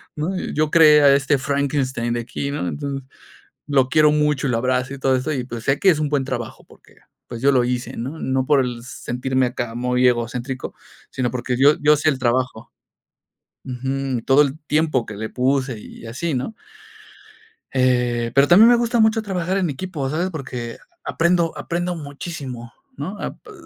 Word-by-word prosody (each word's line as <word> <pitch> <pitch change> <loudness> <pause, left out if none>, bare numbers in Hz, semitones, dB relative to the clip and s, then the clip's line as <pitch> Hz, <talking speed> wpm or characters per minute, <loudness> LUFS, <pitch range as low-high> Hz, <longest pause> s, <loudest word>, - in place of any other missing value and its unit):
¿no? 170 +5 -2 0.2
Yo 155 0 +1
creé 155 -2 +7
a 140 -1 +6
este 140 0 +2
Frankenstein 135 -3 -1
de 120 - -1
aquí, 140 +4 -4
¿no? 140 -11 -3
Entonces, 140 +6 -4 0.7
lo 135 -3 +2
quiero 155 +1 +5
mucho 150 -1 +1
y - - 0
lo 115 - +1
abrazo 130 +2 -1
y - - -9
todo 135 0 +2
eso, 130 +5 -2
y 130 -4 -2
pues 120 -2 -7
sé 135 +1 +1
que 195 - +5
es 160 - +1
un 150 - 0
buen 140 -2 0
trabajo 120 -4 -5
porque, - - -21 0.3
pues 120 -1 -7
yo 140 +1 +4
lo 125 -2 +3
hice, 125 0 -3
¿no? 135 +7 -5
No 130 0 0
por 145 -1 +4
el 125 -2 -3
sentirme 130 +1 -2
acá 120 -2 -4
muy 125 +1 +1
egocéntrico, 125 +2 -2 0.4
sino 125 -2 -1
porque 125 0 -2
yo 145 +3 +5
yo 150 +1 +5
sé 150 +2 +1
el 135 - -3
trabajo 125 -2 -1 0.9
ujú, 130 -1 -3
todo 135 +2 +6
el 140 +1 -2
tiempo 150 -6 +1
que 105 - -8
le 110 +2 -4
puse 130 -1 0
y 105 - -12
así, 140 +7 -3
¿no? 130 - -3 1.2
Eh, 125 -2 +1
pero 140 +1 +5
también 210 +7 +8
me 245 - +6
gusta 235 0 +1
mucho 220 0 +3
trabajar 190 -2 -2
en 180 -4 0
equipo, 150 -2 -4
¿sabes? 170 +5 -1
Porque 125 -7 -6 0.3
aprendo 170 0 +1
aprendo 175 +1 -2
muchísimo, 140 -5 -7 0.2
¿no? 205 +2 -5
apr. - - -7
135 Hz, 185 wpm, -21 LUFS, 125-150 Hz, 1.2 s, también